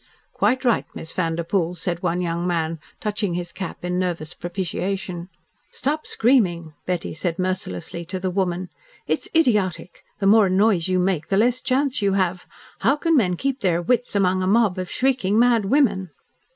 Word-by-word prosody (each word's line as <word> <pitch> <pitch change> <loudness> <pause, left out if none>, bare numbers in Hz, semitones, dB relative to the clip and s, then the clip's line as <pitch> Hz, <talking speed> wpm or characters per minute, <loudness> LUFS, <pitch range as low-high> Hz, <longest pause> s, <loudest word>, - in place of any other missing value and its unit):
"Quite 260 +1 +1
right, 240 - +2
Miss 160 - -6
Vanderpoel," 170 0 -1
said 175 0 -3
one 180 0 0
young 170 0 -1
man, 165 -2 -1 0.2
touching 205 -4 -2
his 175 0 -4
cap 190 -2 -6
in 180 0 -1
nervous 170 -4 -2
propitiation. 180 0 -4 0.4
"Stop 300 +3 -2
screaming," 180 - +2
Betty 180 -2 -2
said 165 +2 -2
mercilessly 185 - -3
to 185 +2 -4
the 185 0 -2
woman. 180 -1 -1 0.4
"It's - - -2
idiotic 210 - +1
the 205 - -2
more 205 -1 +6
noise 190 -2 +3
you 185 0 +1
make 180 -4 0
the 195 - +1
less 245 +4 +3
chance 270 -1 +1
you 200 -1 +2
have. 185 -2 0 0.3
How 275 - +3
can 330 +2 +1
men 185 -10 +3
keep 270 +7 -2
their 180 -6 +1
wits 240 +6 0
among 185 -1 +2
a 185 - 0
mob 205 -2 +3
of 185 -1 -4
shrieking, 250 -6 +1
mad 235 -3 +4
women?" 195 -6 +2
185 Hz, 170 wpm, -23 LUFS, 175-220 Hz, 0.4 s, more